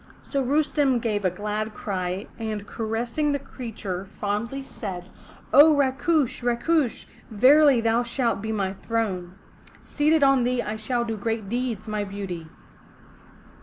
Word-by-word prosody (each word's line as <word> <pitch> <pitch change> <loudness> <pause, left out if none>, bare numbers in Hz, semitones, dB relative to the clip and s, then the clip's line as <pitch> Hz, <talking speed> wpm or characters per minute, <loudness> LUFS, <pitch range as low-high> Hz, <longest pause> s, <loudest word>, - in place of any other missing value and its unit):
So 275 - -1
Rustem 285 -1 +2
gave 215 -3 -1
a - - +4
glad 210 +3 -4
cry, 185 0 -3
and 215 -2 -4
caressing 230 +8 -2
the - - +1
creature 220 -9 -6
fondly, 210 +7 -3
said: 190 -9 -6 0.5
0 300 +1 +8
Rakush! 280 +1 +1
Rakush! 245 +3 0 0.2
verily 265 +4 +6
thou 230 +1 +2
shalt 240 -3 -1
be 220 +1 -3
my 195 -3 -1
throne. 190 -4 -3 0.5
Seated 305 +1 +2
on 270 -2 +5
thee 245 0 0
I 210 - -3
shall 235 +2 -1
do 225 -2 -3
great 220 -1 -3
deeds, 235 -2 -2
my 210 -1 -1
beauty!" 195 -5 -6
230 Hz, 135 wpm, -25 LUFS, 205-265 Hz, 0.5 s, 0